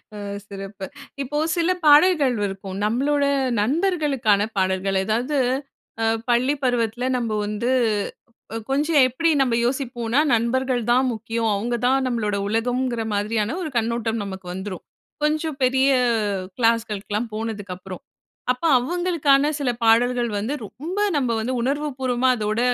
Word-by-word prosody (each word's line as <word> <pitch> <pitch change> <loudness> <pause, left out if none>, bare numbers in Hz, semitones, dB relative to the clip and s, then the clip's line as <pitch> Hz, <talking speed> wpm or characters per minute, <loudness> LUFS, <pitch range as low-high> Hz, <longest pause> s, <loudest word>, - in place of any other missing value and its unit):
அ. - - -7 0.3
சிறப்பு! 195 -1 -7 0.4
இப்போ 295 +3 -4 0.2
சில 340 +1 +2 0.2
பாடல்கள் 295 -3 +5
இருக்கும். 195 -1 -4
நம்பளோட, 280 +6 +1 0.4
நண்பர்களுக்கான 280 - +1 0.2
பாடல்கள். 190 +1 +1
எதாவது, 245 +7 0 0.6
அ 225 - +2 0.2
பள்ளி 245 +4 +3
பருவத்தில 245 -1 0
நம்ப 230 -3 -2
வந்து 210 +4 -2 1.0
கொஞ்சம் 295 +2 +3
எப்படி 295 +7 0
நம்ப 245 -3 +2
யோசிப்போனா 245 -1 -1
"நண்பர்கள் 245 +2 +1
தான் 255 +2 +4
முக்கியம். 225 +1 -2
அவங்க 235 +4 -1
தான் 265 0 +2
நம்மளோட 220 -4 -1
உலகம்ங்குற" 240 +2 -1
மாதிரியான 215 +5 -1
ஒரு 320 - -3
கண்ணோட்டம் 230 -1 -1
நமக்கு 190 -2 -7
வந்துரும். 190 0 -6 0.4
கொஞ்சம் 310 -1 0
பெரிய 265 +2 +3 0.7
கிளாஸ்களுக்லாம் 225 -1 0
போனதுக்கப்பறம். 200 -4 -6 0.5
அப்ப 250 +5 -4 0.2
அவுங்களுக்கான 300 -1 +2
சில 275 -3 0
பாடல்கள் 240 +1 +3
வந்து 225 +7 -2
ரொம்ப 330 - -6 0.2
நம்ப 255 -4 0
வந்து, 250 +4 -2
உணர்வு 290 +4 -1
பூர்வமா 255 0 +1
அதோட 215 +1 -1
240 Hz, 120 wpm, -23 LUFS, 215-275 Hz, 1.0 s, பாடல்கள்